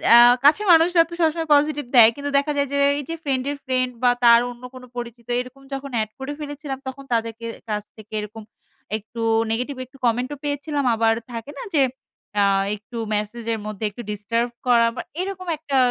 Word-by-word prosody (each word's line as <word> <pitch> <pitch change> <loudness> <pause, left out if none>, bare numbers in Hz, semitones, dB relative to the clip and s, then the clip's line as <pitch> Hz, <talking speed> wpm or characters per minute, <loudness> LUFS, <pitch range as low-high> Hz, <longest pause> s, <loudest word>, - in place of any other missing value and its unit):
আ - - +10 0.3
কাছের 315 +9 +5
মানুষরা 335 +1 +6
তো - - -9
সবসময় 325 0 +1
পজিটিভ 295 0 +1
দেয়। 225 -2 +9
কিন্তু 285 0 -4
দেখা 280 +2 +1
যায় 280 -1 +1
যে, - - +1 0.2
এই - - -4
যে 330 - -2
ফ্রেন্ড 265 -3 0
এর 290 - -5
ফ্রেন্ড 255 -1 0
বা 245 - +6
তার 235 0 +8
অন্য 240 0 -14
কোন 255 -1 -11
পরিচিত 235 -1 -7
এরকম 255 +2 -7
যখন 275 0 -5
এড 215 - -3
করে 270 +2 -4
ফেলেছিলাম। 290 -2 -5
তখন 270 +1 -6
তাদের 230 -1 0
কে 230 - -7 0.2
কাছ 210 -1 -1
থেকে 215 0 -14
এরকম 210 +1 -7 0.5
একটু 220 +2 -9 0.3
নেগেটিভ 250 +5 -2
একটু 260 +2 -19
কমেন্ট 245 +2 +1
ও - - -15
পেয়েছিলাম। 290 0 -2
আবার 225 0 +3 0.2
থাকে 230 +4 -6
না? - - -5
যে 285 - +5 0.6
আ - - +5 0.3
একটু 215 +3 -11 0.2
মেসেজ 210 +3 -4
এর 225 - -3
মধ্যে 215 0 -4
একটু 205 - -9
ডিস্টার্ব 230 +4 -1 0.2
করা 235 -1 +5
বা - - -3 0.2
এরকম 375 -1 -5
একটা 285 -3 -2
255 Hz, 200 wpm, -22 LUFS, 230-290 Hz, 0.6 s, আ